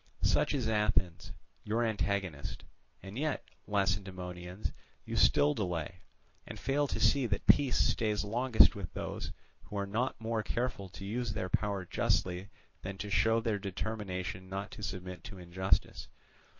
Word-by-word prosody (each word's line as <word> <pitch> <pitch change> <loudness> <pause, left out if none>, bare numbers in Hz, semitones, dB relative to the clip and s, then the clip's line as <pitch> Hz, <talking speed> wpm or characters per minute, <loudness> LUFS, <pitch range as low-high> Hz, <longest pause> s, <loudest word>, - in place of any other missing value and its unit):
"Such - - +3
is 125 -5 0
Athens, 95 -6 +1 0.3
your 110 +3 +1
antagonist. 100 -8 -1 0.4
And 100 +5 -6
yet, 155 -1 -1 0.2
Lacedaemonians, 95 -1 -2 0.3
you - - -4
still 75 0 +5
delay, 90 -2 -3 0.5
and - - -7
fail 145 +1 +1
to - - -2
see 135 -3 +4
that 100 -3 -2
peace 140 -4 +5
stays 105 -3 +2
longest 120 +3 +5
with 95 -4 -6
those, - - -4 0.3
who 105 - -6
are 100 - 0
not 115 +6 -1
more 115 0 -1
careful 115 -4 -2
to 95 +2 -9
use 115 +2 -2
their 95 - -2
power 100 -2 0
justly 90 +2 0 0.3
than 95 +1 -5
to 105 0 -5
show 110 +5 +4
their 110 -2 0
determination 95 -2 -4
not 100 +1 -4
to 110 - -9
submit 90 -2 -5
to 100 -1 -8
injustice. 90 +2 0
100 Hz, 150 wpm, -32 LUFS, 95-110 Hz, 0.5 s, still